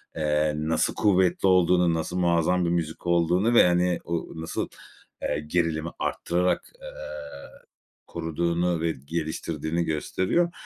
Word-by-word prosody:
eee, 75 -1 +1
nasıl 80 +1 0
kuvvetli 95 -2 +3
olduğunu, 90 -2 +4
nasıl 80 +2 -2
muazzam 85 0 +2
bir - - +1
müzik 85 0 -2
olduğunu 90 +6 +2
ve, 115 - +7
hani, 90 0 +2
o 85 -1 -3
nasıl, 80 - -3 0.5
eee, 75 +1 -2
gerilimi 85 -1 0
arttırarak, 90 +1 0
eee, - - -8 1.2
koruduğunu 85 +1 -1
ve 85 0 +1
geliştirdiğini 80 +1 -2
gösteriyor. 95 - 0
85 Hz, 120 wpm, -26 LUFS, 80-90 Hz, 1.2 s, ve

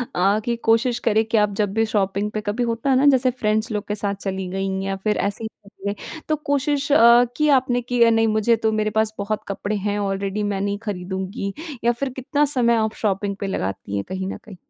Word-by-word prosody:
अ, 195 +4 +3
कि 240 - 0
कोशिश 235 +2 +3
करें 220 +1 +3
कि 225 0 0
आप 210 -1 +2
जब 200 -1 -1
भी 225 0 +2
शॉपिंग 200 -1 -1
पे, 215 - -3
कभी 210 +4 -2
होता 230 +3 -1
है 265 - +4
ना, 275 - +3
जैसे 255 -1 +2
फ्रेंड्स 215 -2 -1
लोग 210 -1 -3
के 210 - -2
साथ 200 -1 -2
चली 190 -1 -3
गईं 190 0 -2
या 195 0 -2
फिर 215 -1 +1
ऐसे 205 +3 -5
ही 220 - -2 0.2
चीज़ें? 200 0 -5 0.3
तो 310 - +3
कोशिश 285 -1 -1
अ, 240 -3 +7
की 305 -1 +3
आपने 250 -1 -1
कि 245 0 -2
अ, 230 - +6
"नहीं, 225 0 +3
मुझे 220 +2 +3
तो 220 - +3
मेरे 215 0 0
पास 220 0 +1
बहुत 205 +1 -3
कपड़े 200 +1 -3
हैं 205 0 -1
ऑलरेडी, 195 +1 -2
मैं 200 -1 -1
नहीं 200 0 -1
खरीदूँगी।" 190 +1 -4 0.3
या 240 - +4
फिर 260 +3 -3
कितना 285 +3 +1
समय 235 -2 +3
आप 220 -1 0
शॉपिंग 200 -1 0
पे 200 - -3
लगाती 100 - -3
हैं 100 - -1
कहीं 190 0 -3
न - - -7
कहीं? 205 - -13
215 Hz, 235 wpm, -22 LUFS, 200-235 Hz, 0.3 s, अ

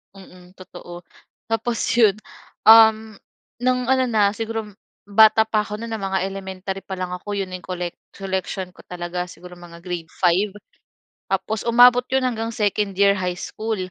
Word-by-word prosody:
Mm, 185 -1 -16
totoo. 175 -1 -11 0.4
Tapos 225 +1 -2 0.2
'yon, 220 -4 +4 0.5
um, 220 0 +7 0.5
no'ng 250 0 +1
ano 260 0 +3
na 205 -3 +2
siguro 225 -1 -5 0.3
bata 220 +2 +5
pa 220 -1 +1
ako 210 - -6
no'n 230 +1 -7
ng 220 - -4
mga 195 0 -1
elementary 195 0 -6
pa 190 - -6
lang 180 -1 -4
ako 200 +3 -5
'yon 195 -1 -3
na 185 - -5
'yong 180 - -17
collec 180 -2 -4 0.2
collection 190 -1 -4
ko - - -16
talaga, 180 0 -5
siguro 180 0 -12
mga 175 -1 -13
grade 175 -3 -6
5 190 +3 +2 0.8
Tapos 195 +3 -2
umabot 245 +1 +6
'yon 265 0 +1
hanggang 230 -2 -2
2nd 205 -2 -1
year 200 0 +5
high 180 -1 -3
school. 220 0 -4
200 Hz, 165 wpm, -22 LUFS, 185-220 Hz, 0.8 s, um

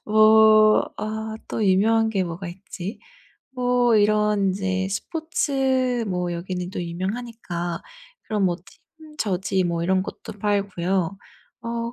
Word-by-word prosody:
뭐 215 0 +6
아 220 0 -4
또 220 - -1
유명한 220 +4 +3
게 195 -3 0
뭐가 170 +2 -6
있지? 185 +1 -7 0.6
어 245 -1 +3
이런 210 -1 +3
이제 190 0 -1
스포츠 265 -1 0
뭐 180 -2 -1
여기는 180 +1 -4
또 180 - -4
유명하니까 180 -1 -4 0.4
그런 210 -3 -1
뭐 175 -2 +1
팀 310 +9 -18
저지 190 -2 0
뭐 170 -1 -1
이런 185 +1 +2
것도 205 - -9
팔고요. 195 -2 0 0.4
어 235 0 -3
205 Hz, 220 characters per minute, -23 LUFS, 185-225 Hz, 0.6 s, 뭐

